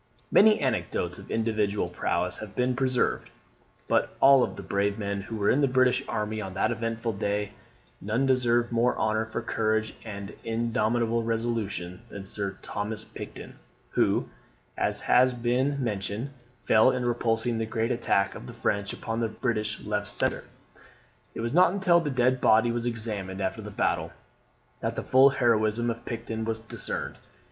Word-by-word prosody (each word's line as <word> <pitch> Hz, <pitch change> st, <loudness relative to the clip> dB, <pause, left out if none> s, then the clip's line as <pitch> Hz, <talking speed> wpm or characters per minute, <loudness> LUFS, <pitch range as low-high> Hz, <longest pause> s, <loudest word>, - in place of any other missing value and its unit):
Many 215 Hz, +1 st, +6 dB
anecdotes 130 Hz, -6 st, -1 dB
of -, -, -12 dB
individual 105 Hz, -4 st, 0 dB
prowess 90 Hz, +1 st, -1 dB
have 105 Hz, -2 st, -9 dB
been 125 Hz, 0 st, +1 dB
preserved: 130 Hz, -1 st, 0 dB, 0.6 s
but -, -, +3 dB
of -, -, -18 dB
all 135 Hz, -1 st, +6 dB
the 100 Hz, -, -9 dB
brave 100 Hz, +1 st, 0 dB
men 100 Hz, -2 st, -3 dB
who 110 Hz, +3 st, -7 dB
were 105 Hz, -2 st, +2 dB
in 140 Hz, -, +2 dB
the 140 Hz, -, +4 dB
British 130 Hz, -1 st, +3 dB
army 105 Hz, 0 st, -2 dB
on 95 Hz, -2 st, -6 dB
that 95 Hz, -, +1 dB
eventful 115 Hz, 0 st, -2 dB
day, 100 Hz, +1 st, -2 dB, 0.5 s
none 110 Hz, +7 st, 0 dB
deserve 120 Hz, -2 st, +2 dB
more 120 Hz, +1 st, +2 dB
honour 110 Hz, 0 st, 0 dB
for 110 Hz, +1 st, -4 dB
courage 110 Hz, -1 st, 0 dB
and 100 Hz, -2 st, -7 dB
indomitable 115 Hz, 0 st, 0 dB
resolution 115 Hz, -6 st, -2 dB
than 100 Hz, -2 st, -8 dB
Sir 95 Hz, -1 st, -4 dB
Thomas 105 Hz, +1 st, -3 dB
Picton, -, -, -10 dB, 0.3 s
who, -, -, +2 dB, 0.5 s
as -, -, 0 dB
has 130 Hz, 0 st, +4 dB
been 130 Hz, +4 st, 0 dB
mentioned, 105 Hz, +3 st, -3 dB, 0.3 s
fell 110 Hz, +3 st, +5 dB
in 125 Hz, -1 st, -1 dB
repulsing 115 Hz, -1 st, 0 dB
the 110 Hz, -, -2 dB
great 115 Hz, +2 st, -1 dB
attack 100 Hz, -5 st, +1 dB
of -, -, -9 dB
the -, -, -8 dB
French 100 Hz, 0 st, -1 dB
upon 115 Hz, 0 st, -4 dB
the 115 Hz, -, +1 dB
British 110 Hz, -2 st, -2 dB
left 105 Hz, -1 st, -2 dB
centre. -, -, -1 dB, 0.9 s
It -, -, -4 dB
was 115 Hz, +2 st, -2 dB
not 180 Hz, +1 st, +5 dB
until 185 Hz, -3 st, +4 dB
the 160 Hz, -3 st, -2 dB
dead 130 Hz, -1 st, +2 dB
body 115 Hz, +2 st, +4 dB
was 120 Hz, 0 st, -2 dB
examined 105 Hz, -5 st, -1 dB
after 95 Hz, -1 st, -2 dB
the -, -, -7 dB
battle, -, -, -1 dB, 0.7 s
that -, -, -2 dB
the -, -, -3 dB
full 130 Hz, +1 st, +6 dB
heroism 120 Hz, -2 st, +2 dB
of 115 Hz, +1 st, -8 dB
Picton 115 Hz, -1 st, -4 dB
was 110 Hz, 0 st, -2 dB
discerned. 110 Hz, 0 st, -4 dB
115 Hz, 165 wpm, -27 LUFS, 105-120 Hz, 0.9 s, Many